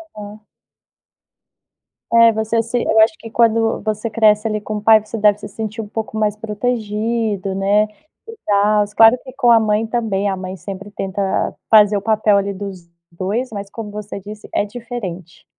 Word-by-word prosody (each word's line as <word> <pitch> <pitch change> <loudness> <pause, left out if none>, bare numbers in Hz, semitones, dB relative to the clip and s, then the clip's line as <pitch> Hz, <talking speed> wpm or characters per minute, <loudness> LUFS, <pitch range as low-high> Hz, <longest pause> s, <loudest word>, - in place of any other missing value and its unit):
uhum. 210 0 -9 1.7
É 230 0 +6
você 220 +1 0
se 235 +2 -2
eu 220 - +2
acho 220 +7 +5
que 225 - -10
quando 225 -1 +2
você 215 +1 -2
cresce 215 0 +3
ali 215 -1 -2
com 215 - -5
o - - -6
pai 220 0 +7
você 220 +1 -6
deve 210 -1 +3
se - - -8
sentir 220 0 -5
um 210 - -8
pouco 220 0 -5
mais 210 -1 0
protegido, 215 -2 -2
né, 200 +2 +2 0.4
e 455 - -9
tals, 205 0 +2
claro 225 +3 +6
que 260 - -11
com 245 -2 +1
a 230 - +7
mãe 215 0 +1
também 215 -4 -1
a 190 - -2
mãe 185 0 -6
sempre 195 +2 -8
tenta 195 0 -4 0.5
fazer 210 -2 +6
o - - -3
papel 215 -1 +2
ali 200 0 -1
dos 190 -3 -8 0.2
dois, 205 +9 -3
mas 200 -2 -6
como 220 0 -7
você 210 -1 -7
disse 210 +2 -10
é - - +1
diferente. 205 -7 -8
210 Hz, 180 wpm, -18 LUFS, 200-225 Hz, 1.7 s, pai